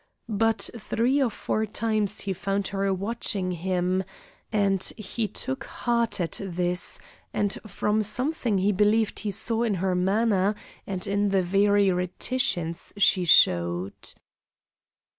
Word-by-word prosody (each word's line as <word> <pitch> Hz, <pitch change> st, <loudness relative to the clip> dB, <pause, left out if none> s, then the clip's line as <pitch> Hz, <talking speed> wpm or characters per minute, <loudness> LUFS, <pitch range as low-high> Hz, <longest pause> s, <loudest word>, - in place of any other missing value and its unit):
But 225 Hz, 0 st, +1 dB
three 245 Hz, +6 st, +1 dB
or 260 Hz, -, +3 dB
four 220 Hz, 0 st, -2 dB
times 215 Hz, -1 st, -1 dB
he 195 Hz, -, -2 dB
found 195 Hz, +1 st, -2 dB
her 195 Hz, 0 st, 0 dB
watching 195 Hz, -1 st, -2 dB
him, 180 Hz, +1 st, 0 dB, 0.5 s
and 200 Hz, -3 st, +2 dB, 0.2 s
he 215 Hz, +1 st, -3 dB
took 265 Hz, +6 st, -3 dB
heart 235 Hz, -3 st, -1 dB
at 170 Hz, +2 st, -2 dB
this 180 Hz, -1 st, -1 dB, 0.4 s
and 205 Hz, -1 st, +1 dB
from 210 Hz, +2 st, 0 dB
something 240 Hz, +1 st, -1 dB
he 195 Hz, +2 st, +2 dB
believed 210 Hz, +2 st, +2 dB
he 215 Hz, -, -2 dB
saw 225 Hz, +3 st, +1 dB
in 225 Hz, -4 st, +1 dB
her 185 Hz, +1 st, 0 dB
manner 195 Hz, +2 st, +2 dB, 0.3 s
and 185 Hz, -2 st, -3 dB
in 200 Hz, 0 st, +1 dB
the 195 Hz, -1 st, +2 dB
very 200 Hz, +2 st, +3 dB
reticence 180 Hz, -1 st, -1 dB
she 185 Hz, -2 st, +4 dB
showed. 85 Hz, -, +4 dB
200 Hz, 130 wpm, -26 LUFS, 185-220 Hz, 0.5 s, she